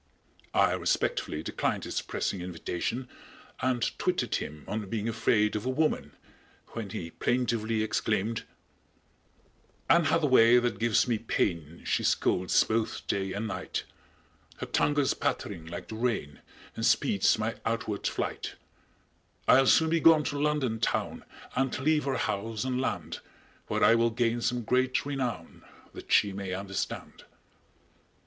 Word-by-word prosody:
I - - +4
respectfully 75 - -1
declined - - -1
his - - -2
pressing 95 - -3
invitation 90 +8 -3 0.5
and 125 -2 0 0.2
twitted - - 0
him 75 0 -3
on 105 -2 -4
being 110 0 -2
afraid 110 -2 +2
of 105 - -2
a 130 - -2
woman, 155 +4 0 0.6
when 110 -3 -6
he 85 -3 -6
plaintively 115 -2 0
exclaimed: 110 0 -1 1.5
_Anne 170 0 +5
Hath 160 +2 +2
a - - +5
way 125 -3 +6
that 120 0 0
gives 115 0 +3
me 115 -3 +1
pain, 85 -7 -2
She - - 0
scolds 90 0 +3
both 110 0 -2
day 95 -1 -1
and 110 +2 -3
night; 95 -3 -4 0.7
Her - - -4
tongue 145 - +1
goes 145 -2 +2
pattering 80 -1 -3
like 85 +1 -7
the 110 - -5
rain 110 -12 -2 0.3
And 115 - -4
speeds 110 -3 +3
my 110 +1 -2
outward 110 -2 -2
flight; - - -3 0.9
I'll 135 0 +6
soon 160 +4 +5
be 165 - +3
gone 160 -2 +6
to 145 0 -3
London 145 -7 0
town 115 - -1 0.3
And 130 0 0
leave 150 +2 +1
her 135 -2 0
house 110 +1 -2
and 130 0 -1
land - - -3 0.5
Where - - 0
I 115 - +7
will 115 0 +3
gain 120 +1 0
some 120 +1 0
great 130 +4 +1
renown 125 - -4 0.3
That - - -10
she 100 -2 +4
may 95 -1 -4
understand. 95 0 -5
115 Hz, 145 wpm, -29 LUFS, 100-130 Hz, 1.5 s, I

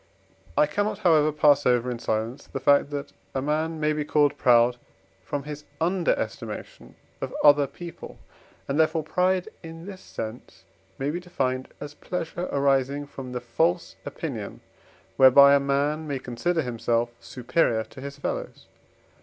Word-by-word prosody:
I - - +6
cannot, 205 +8 -1
however, 155 -3 +4
pass 145 -1 +4
over 125 0 +2
in 120 - -5
silence 110 +3 -3
the 135 - -5
fact, 140 +1 +4
that 145 -1 -5 0.2
a 135 - 0
man 155 +2 -1
may 150 0 +1
be 150 0 -1
called 145 -1 +2
proud 120 0 +4 0.5
from 140 +9 -4
his 150 0 -7 0.2
underestimation 175 +1 -2 0.3
of - - -3
other 145 -1 +6
people; 170 +5 -10 0.5
and, 140 +3 -1
therefore, 160 0 +2
pride 180 +3 +1
in 165 0 -10
this 190 -2 -9
sense 110 +2 -8 0.3
may 140 +2 -1
be 175 - -3
defined 130 -8 -2
as 145 0 -7
pleasure 175 +2 -4
arising 140 0 +1
from 135 -3 -9
the 125 -1 -4
false 115 -7 0
opinion, - - -6 0.6
whereby 140 +2 +8
a 140 - +6
man 145 +3 0
may 140 -2 -2
consider 145 +7 -1
himself 120 -1 -1
superior 120 -3 0
to 130 - -13
his 140 +1 -7
fellows. 140 - -5
145 Hz, 150 wpm, -25 LUFS, 130-155 Hz, 0.6 s, whereby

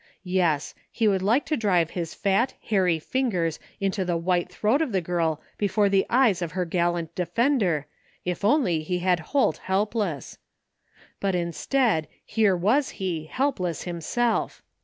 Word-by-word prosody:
Yes, 180 -6 0 0.2
he 225 - +1
would 195 -2 +2
like 225 +9 +2
to 310 - 0
drive 180 - +1
his 170 -3 -4
fat, 200 +6 +1
hairy 185 -6 +1
fingers 180 - -1 0.2
into 195 0 0
the 175 -2 0
white 175 +1 0
throat 215 - +1
of 285 -9 -1
the 190 - +3
girl 165 -3 -1 0.2
before 205 0 +2
the 195 -1 +2
eyes 235 -7 +3
of 170 -2 -3
her 185 -1 -1
gal 175 0 +1
lant 170 -1 -5
defender 185 - +1 0.4
if 180 +2 -3
only 205 - +3
he 180 +3 -2
had 180 0 +2
Holt 270 - +1
helpless! 195 - -2 0.8
But 195 -2 0
instead, 175 - 0 0.2
here 210 -5 +2
was 240 +11 +2
he, 175 -5 -3
helpless 180 - -1
himself! 185 +7 -1
185 Hz, 155 wpm, -25 LUFS, 170-220 Hz, 0.8 s, the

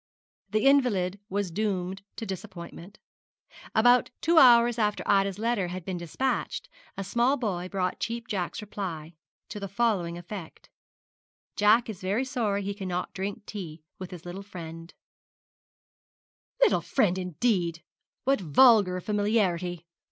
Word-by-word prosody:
The 215 +4 0
invalid 210 -9 +3
was 200 -2 -2
doomed 190 -1 -2
to 225 - -5
disappointment. 190 -1 -8 0.8
About 245 +2 +5
two 330 0 +4
hours 240 -2 +6
after 210 -1 0
Ida's 195 -1 +2
letter 220 -4 0
had 180 -1 -6
been 185 -2 -3
despatched, 215 - -2 0.3
a 195 - -3
small 240 +8 +2
boy 185 -7 -3
brought 185 -2 -2
Cheap 235 +1 -4
Jack's 195 0 -3
reply, 175 -6 -6 0.4
to 210 - -6
the 200 - -4
following 195 -5 0
effect: 175 0 -9 0.9
'Jack 215 +3 +4
is 215 -5 -7
very 200 +8 0
sorry 210 -6 -1
he 200 +1 -2
cannot 185 -3 -4
drink 200 +2 -5
tea 165 -6 -7 0.2
with 185 -1 -6
his 180 -2 -10
little 175 +3 -6
friend 165 -4 -9 0.9
' - - -9
'Little - - +4
friend, 190 -8 +1
indeed! 180 -2 -1 0.4
What 270 -3 +2
vulgar 185 - +5
familiarity!' 185 -5 0
195 Hz, 135 wpm, -27 LUFS, 180-225 Hz, 0.9 s, hours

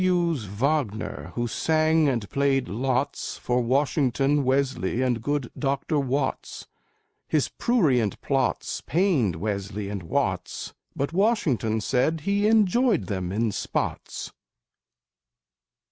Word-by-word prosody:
W's 170 -8 +1
Wagner, 105 - -2
who 120 - 0
sang 155 +3 +2
and 115 -6 -1
played 135 -2 +1
lots, 130 +5 -1
For 125 0 0
Washington, 135 +2 +2
Wesley 130 -4 0
and 120 -3 0
good 145 0 -2
Dr. 140 +2 0
Watts; 135 0 -2 0.6
His - - +1
prurient 140 - +1
plots 135 -2 -1
pained 155 - +2
Wesley 100 +2 -3
and 100 -2 -4
Watts, 85 - -2 0.2
But 140 +4 -2
Washington 155 - +1
said 140 +8 +1
he 200 +5 +1
"enjoyed 220 - +3
them 95 -4 -3
in 110 +2 0
spots." - - -3
135 Hz, 110 wpm, -25 LUFS, 110-155 Hz, 0.6 s, enjoyed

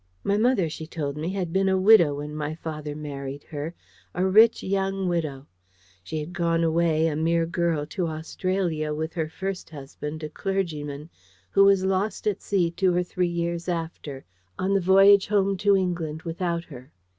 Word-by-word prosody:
My 200 - +1
mother, 220 -4 +2
she 155 0 -7
told 145 -4 -4
me, 155 +3 -3
had 185 -3 -3
been 190 0 +2
a 190 - +2
widow 185 -7 +6
when 150 +1 -6
my 155 0 -3
father 155 -2 -6
married 140 -2 -6
her 155 +3 -6 0.4
a 180 - +1
rich 220 +5 +5
young 195 0 -1
widow. 155 -6 -2 0.6
She 155 +13 -5
had 155 +4 -6
gone 170 -2 +1
away, 165 -1 +2
a 160 -2 0
mere 165 +2 +1
girl, 170 -3 0
to 175 +3 -3
Australia 160 -1 -2
with 160 +1 -3
her 160 -3 -2
first 190 +3 -5
husband, 150 +1 -7
a 155 - -4
clergyman, 155 -5 -3 0.4
who 195 - +5
was 195 -1 +4
lost 195 +2 -1
at 210 -3 0
sea 180 -4 +1
two 180 0 +1
or 180 - +2
three 180 0 -1
years 170 0 -2
after, 160 -5 -5 0.3
on 190 +1 0
the 195 - +3
voyage 195 +2 +6
home 200 -1 +2
to 200 0 +4
England 170 -4 -2
without 170 0 -2
her. 135 -3 -12
170 Hz, 180 wpm, -25 LUFS, 155-190 Hz, 0.6 s, widow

